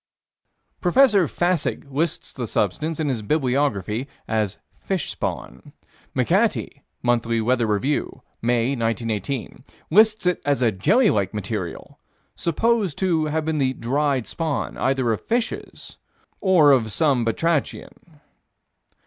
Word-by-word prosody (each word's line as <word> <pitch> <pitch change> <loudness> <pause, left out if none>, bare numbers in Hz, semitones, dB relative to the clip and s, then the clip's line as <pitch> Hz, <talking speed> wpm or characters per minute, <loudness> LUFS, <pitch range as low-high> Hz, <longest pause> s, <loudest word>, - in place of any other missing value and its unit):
Prof. 175 - -1
Fassig 180 - +3
lists 155 +4 -2
the 125 -3 -4
substance, 150 - -1
in 155 - 0
his 125 -5 -1
"Bibliography," 125 - 0 0.2
as 110 -3 -1 0.2
fish - - -2
spawn. 60 +1 -6 0.4
McAtee - - +1 0.2
(Monthly 115 -1 +1
Weather 120 +1 +1
Review, 130 +4 -1 0.2
May, 120 +1 +1
1918) 115 +1 -3 0.3
lists 215 +2 +4
it 180 0 +1
as 140 -3 +1
a 115 - +3
jelly 205 - +3
like 100 +1 -1
material, 100 -4 -5 0.3
supposed 200 0 0
to 170 -5 +1
have 155 +1 -1
been 160 -1 -1
the 130 -1 +1
"dried" 135 +1 0
spawn 160 -5 -3
either 130 -3 +1
of - - -4
fishes 235 0 -4 0.4
or 175 -7 +5
of 115 -5 +2
some 140 -3 +2
batrachian. 155 +4 -2
135 Hz, 120 wpm, -23 LUFS, 115-165 Hz, 0.4 s, or